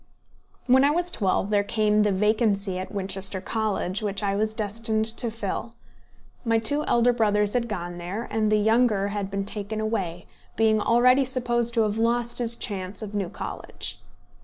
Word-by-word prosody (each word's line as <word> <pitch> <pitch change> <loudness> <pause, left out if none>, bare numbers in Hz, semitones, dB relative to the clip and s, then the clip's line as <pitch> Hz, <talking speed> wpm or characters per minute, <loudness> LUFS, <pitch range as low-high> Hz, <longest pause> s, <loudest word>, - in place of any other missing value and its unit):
When 260 +1 +5
I 285 - +5
was 350 +3 +1
twelve 195 - 0
there 205 -1 +4
came 210 0 +2
the 210 -1 +2
vacancy 200 -1 +1
at 185 - -6
Winchester 195 -1 -2
College 210 -1 -2
which 205 -1 -1
I 200 -1 0
was 215 +1 -1
destined 220 +1 -1
to 230 +1 -2
fill. 225 +1 -5 0.7
My 230 -2 +2
two 285 +7 +1
elder 240 +1 +3
brothers 210 -3 +1
had 240 -1 0
gone 175 -4 -5
there, 185 +6 -4
and 215 0 +1
the 215 - +4
younger 215 -2 +2
had 200 -1 -3
been 195 0 -3
taken 210 +1 -4
away, 190 -6 -2 0.3
being 220 -1 +3
already 250 +4 +4
supposed 240 -2 0
to 225 - +4
have 215 +1 -1
lost 235 +1 +1
his 235 -1 +2
chance 195 -2 -4
of 210 -1 -7
New 200 -4 -2
College. - - -5
215 Hz, 175 wpm, -25 LUFS, 200-230 Hz, 0.7 s, When